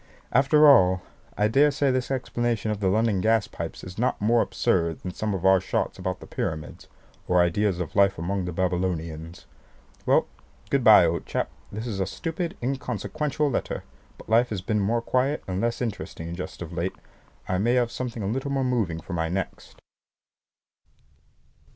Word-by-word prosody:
After 140 Hz, +4 st, +5 dB
all, 95 Hz, -9 st, +6 dB, 0.3 s
I 105 Hz, -, +3 dB
daresay 140 Hz, +3 st, +3 dB
this 130 Hz, -1 st, -1 dB
explanation 120 Hz, -4 st, -1 dB
of 105 Hz, -, -3 dB
the 100 Hz, -, 0 dB
London 105 Hz, 0 st, +2 dB
gas 110 Hz, +1 st, +2 dB
pipes -, -, -7 dB
is 90 Hz, +2 st, -8 dB
not 125 Hz, -, +1 dB
more 115 Hz, +3 st, +3 dB
absurd 85 Hz, -3 st, 0 dB
than 90 Hz, -, -5 dB
some 105 Hz, +1 st, -2 dB
of 95 Hz, 0 st, -4 dB
our 95 Hz, -1 st, +6 dB
shots -, -, -2 dB
about -, -, -3 dB
the -, -, -9 dB
Pyramids, 80 Hz, -1 st, -5 dB, 0.4 s
or 90 Hz, -, +3 dB
ideas 90 Hz, +2 st, +2 dB
of 90 Hz, -, -5 dB
life 100 Hz, -1 st, +4 dB
among 95 Hz, +3 st, -2 dB
the 90 Hz, -, -3 dB
Babylonians. 85 Hz, -2 st, -2 dB, 0.6 s
Well, -, -, +4 dB, 0.5 s
good -, -, +2 dB
bye, -, -, +8 dB
old -, -, -1 dB
chap; -, -, -2 dB, 0.2 s
this 110 Hz, +3 st, -5 dB
is 105 Hz, -5 st, -4 dB
a 95 Hz, -, 0 dB
stupid 165 Hz, -, -4 dB
inconsequential 135 Hz, +4 st, -2 dB
letter, -, -, -2 dB, 0.3 s
but -, -, -14 dB
life 115 Hz, +3 st, +3 dB
has 105 Hz, -4 st, -3 dB
been 105 Hz, +2 st, 0 dB
more 115 Hz, +4 st, 0 dB
quiet 130 Hz, +5 st, 0 dB
and 95 Hz, 0 st, -2 dB
less 120 Hz, +1 st, -1 dB
interesting 90 Hz, -7 st, -5 dB
just 90 Hz, 0 st, -6 dB
of 85 Hz, 0 st, -9 dB
late. 85 Hz, +2 st, -2 dB, 0.5 s
I 90 Hz, 0 st, 0 dB
may 120 Hz, +5 st, +2 dB
have 120 Hz, -2 st, +2 dB
something 120 Hz, -4 st, -4 dB
a -, -, -2 dB
little 130 Hz, +6 st, -2 dB
more 135 Hz, -1 st, 0 dB
moving 110 Hz, -11 st, 0 dB
for 90 Hz, -, -8 dB
my 80 Hz, -1 st, -1 dB
next. 95 Hz, +2 st, -5 dB
105 Hz, 175 wpm, -25 LUFS, 90-125 Hz, 0.6 s, bye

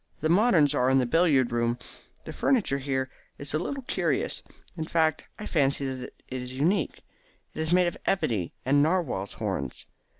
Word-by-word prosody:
The 155 Hz, -, +1 dB
moderns 175 Hz, -, +4 dB
are 130 Hz, -3 st, +2 dB
in 135 Hz, -, +4 dB
the 130 Hz, -, +3 dB
billiard 145 Hz, -3 st, +3 dB
room. 120 Hz, 0 st, +1 dB, 0.5 s
The -, -, -6 dB
furniture 210 Hz, -, +1 dB
here 130 Hz, -1 st, -2 dB, 0.3 s
is 140 Hz, 0 st, -5 dB
a 155 Hz, -, +1 dB
little 270 Hz, -, -4 dB
curious. -, -, -1 dB, 0.3 s
In 160 Hz, -2 st, -3 dB
fact, 160 Hz, -1 st, +1 dB
I 210 Hz, -, -7 dB
fancy 140 Hz, -5 st, +1 dB
that 130 Hz, -1 st, -8 dB
it 130 Hz, -1 st, -4 dB
is 125 Hz, 0 st, -7 dB
unique. 170 Hz, +9 st, 0 dB, 0.5 s
It -, -, -8 dB
is 160 Hz, +1 st, -2 dB
made 180 Hz, 0 st, +5 dB
of 175 Hz, -, -2 dB
ebony 110 Hz, -, 0 dB
and 140 Hz, +2 st, +4 dB
narwhals' 150 Hz, -, 0 dB
horns. 70 Hz, -2 st, -4 dB
145 Hz, 175 wpm, -27 LUFS, 130-170 Hz, 0.5 s, made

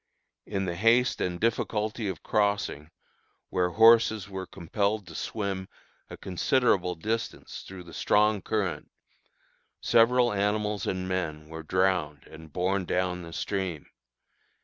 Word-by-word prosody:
In 95 Hz, -2 st, -2 dB
the 85 Hz, -2 st, -3 dB
haste 115 Hz, +6 st, +3 dB
and 90 Hz, -1 st, -2 dB
difficulty 110 Hz, -1 st, -1 dB
of 95 Hz, -4 st, -5 dB
crossing, 100 Hz, -7 st, 0 dB, 0.6 s
where 90 Hz, -1 st, +1 dB
horses 110 Hz, 0 st, +5 dB
were 95 Hz, -2 st, -6 dB
compelled 100 Hz, +5 st, -2 dB
to -, -, -11 dB
swim 100 Hz, -3 st, -3 dB, 0.4 s
a -, -, -8 dB
considerable 95 Hz, -2 st, +1 dB
distance 110 Hz, +7 st, -4 dB
through 95 Hz, -1 st, -10 dB
the 85 Hz, -, -13 dB
strong 105 Hz, -1 st, +2 dB
current, 95 Hz, -9 st, -2 dB, 0.9 s
several 120 Hz, 0 st, +4 dB
animals 105 Hz, 0 st, 0 dB
and 95 Hz, -1 st, -2 dB
men 80 Hz, -5 st, -3 dB
were 80 Hz, 0 st, -7 dB
drowned 85 Hz, -4 st, 0 dB
and 80 Hz, 0 st, -13 dB
borne 95 Hz, +3 st, 0 dB
down 90 Hz, 0 st, -1 dB
the 85 Hz, -1 st, -9 dB
stream. 90 Hz, -4 st, -3 dB
95 Hz, 125 wpm, -28 LUFS, 90-105 Hz, 0.9 s, horses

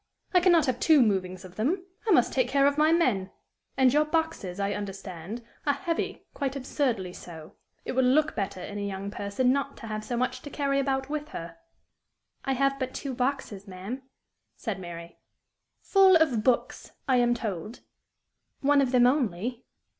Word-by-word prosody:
I 360 Hz, -, +7 dB
can 360 Hz, +1 st, +4 dB
not 335 Hz, -2 st, +5 dB
have 255 Hz, -2 st, -1 dB
two 315 Hz, -3 st, +5 dB
movings 190 Hz, -5 st, +1 dB
of 185 Hz, 0 st, -13 dB
them; 340 Hz, -, 0 dB, 0.2 s
I -, -, +5 dB
must 250 Hz, -9 st, +4 dB
take 255 Hz, -2 st, +2 dB
care 275 Hz, +2 st, +3 dB
of 285 Hz, 0 st, +3 dB
my 305 Hz, +1 st, +4 dB
men. 240 Hz, -, +2 dB, 0.5 s
And 260 Hz, -1 st, +5 dB
your 300 Hz, +1 st, +5 dB
boxes, 305 Hz, -, -2 dB
I 200 Hz, 0 st, 0 dB
understand, 195 Hz, +1 st, -6 dB, 0.2 s
are 285 Hz, -, +3 dB
heavy, 330 Hz, +3 st, -3 dB
quite 275 Hz, -2 st, -2 dB
absurdly 250 Hz, -9 st, -1 dB
so. 160 Hz, -4 st, -10 dB, 0.3 s
It -, -, -2 dB
would 260 Hz, 0 st, +2 dB
look 300 Hz, +5 st, +3 dB
better 195 Hz, -2 st, -3 dB
in 205 Hz, +2 st, -6 dB
a -, -, -3 dB
young 200 Hz, 0 st, -4 dB
person 205 Hz, +6 st, +1 dB
not 280 Hz, 0 st, -2 dB
to -, -, -9 dB
have 215 Hz, -1 st, -4 dB
so 240 Hz, +2 st, -3 dB
much 255 Hz, +1 st, -1 dB
to 290 Hz, -, -8 dB
carry 280 Hz, -1 st, 0 dB
about 265 Hz, -1 st, 0 dB
with 300 Hz, 0 st, -3 dB
her." 170 Hz, -, -7 dB, 0.9 s
"I 270 Hz, -, 0 dB
have 275 Hz, +1 st, +1 dB
but 260 Hz, -1 st, -3 dB
two 275 Hz, -2 st, -4 dB
boxes, 250 Hz, -6 st, -2 dB
ma'am," 195 Hz, +8 st, -6 dB, 0.5 s
said 210 Hz, -5 st, -4 dB
Mary. 170 Hz, -1 st, -9 dB, 0.6 s
"Full 385 Hz, -2 st, +6 dB
of 275 Hz, -10 st, +3 dB
books, 250 Hz, 0 st, 0 dB
I 260 Hz, -2 st, +4 dB
am 240 Hz, 0 st, +3 dB
told." 210 Hz, -1 st, -5 dB, 0.8 s
"One 285 Hz, 0 st, +4 dB
of 260 Hz, -2 st, +1 dB
them 250 Hz, -1 st, +5 dB
only." 245 Hz, -, 0 dB
250 Hz, 185 wpm, -27 LUFS, 200-280 Hz, 0.9 s, I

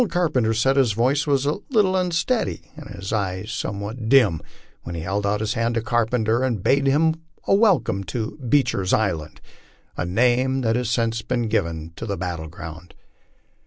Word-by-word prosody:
Carpenter 130 Hz, -11 st, +1 dB
said 135 Hz, +5 st, +2 dB
his 125 Hz, -6 st, +3 dB
voice 130 Hz, +7 st, +1 dB
was 140 Hz, -1 st, +2 dB
a 150 Hz, +6 st, 0 dB
little 210 Hz, -7 st, +3 dB
unsteady 185 Hz, +6 st, -1 dB
and 150 Hz, -3 st, -10 dB
his 100 Hz, +1 st, -6 dB
eyes 100 Hz, 0 st, -2 dB
somewhat 110 Hz, +3 st, -4 dB
dim 115 Hz, -, +4 dB, 0.4 s
when 85 Hz, -, -7 dB
he 80 Hz, -, -4 dB
held 100 Hz, +4 st, -1 dB
out 105 Hz, +1 st, 0 dB
his 110 Hz, -, -1 dB
hand 115 Hz, 0 st, 0 dB
to 115 Hz, -, +1 dB
Carpenter 115 Hz, 0 st, +1 dB
and 120 Hz, -7 st, -1 dB
bade 140 Hz, 0 st, +3 dB
him 160 Hz, +3 st, +2 dB, 0.3 s
welcome 195 Hz, -, +3 dB
to 110 Hz, 0 st, -4 dB
"Beecher's 125 Hz, -8 st, +1 dB
Island," 80 Hz, -8 st, -1 dB, 0.5 s
a -, -, -2 dB
name 125 Hz, +8 st, +2 dB
that 115 Hz, -2 st, +1 dB
has 125 Hz, -2 st, -1 dB
since 115 Hz, -1 st, 0 dB
been 120 Hz, 0 st, -1 dB
given 85 Hz, -7 st, -2 dB
to 115 Hz, -, -6 dB
the 100 Hz, -, -2 dB
battle 85 Hz, -2 st, -4 dB
ground. 80 Hz, +1 st, -10 dB
115 Hz, 170 wpm, -23 LUFS, 100-135 Hz, 0.5 s, dim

